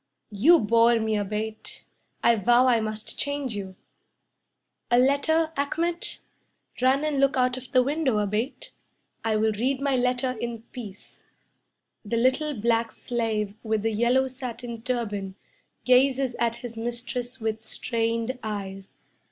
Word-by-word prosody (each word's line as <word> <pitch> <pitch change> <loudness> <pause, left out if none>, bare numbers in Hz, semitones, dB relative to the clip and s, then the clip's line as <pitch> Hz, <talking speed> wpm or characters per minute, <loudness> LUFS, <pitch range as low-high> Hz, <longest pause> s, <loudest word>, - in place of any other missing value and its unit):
"You 270 - +6
bore 230 -1 +4
me, 220 -1 0
Abate, 215 +2 -4 0.4
I 235 - +5
vow 240 +4 +4
I 245 -3 +4
must 215 0 -4
change 285 -5 -2
you! 190 -2 -6 1.1
A 240 - +4
letter, 315 +5 +3
Achmet? 335 +5 -1 0.6
Run 265 +3 +3
and 300 -2 0
look 275 0 +3
out 250 -1 +2
of 255 0 -9
the 255 -2 +5
window, 280 -4 0
Abate. 210 +6 -2 0.5
I 225 -1 +1
will 220 +1 +2
read 255 +6 0
my 275 -1 +1
letter 250 +1 +1
in 235 -1 -5
peace." 210 -6 -10 0.8
The 230 +2 -2
little 260 +2 +1
black 230 +1 +1
slave 220 -4 -2
with 220 -2 -1
the 225 0 0
yellow 240 +4 +3
satin 245 -3 -7
turban 210 -6 -3 0.5
Gazes 260 0 +3
at 230 0 +1
his 235 -1 -7
mistress 240 +2 -4
with 220 0 -3
strained 230 +2 -1
eyes. 195 -3 -6
235 Hz, 135 wpm, -26 LUFS, 220-260 Hz, 1.1 s, You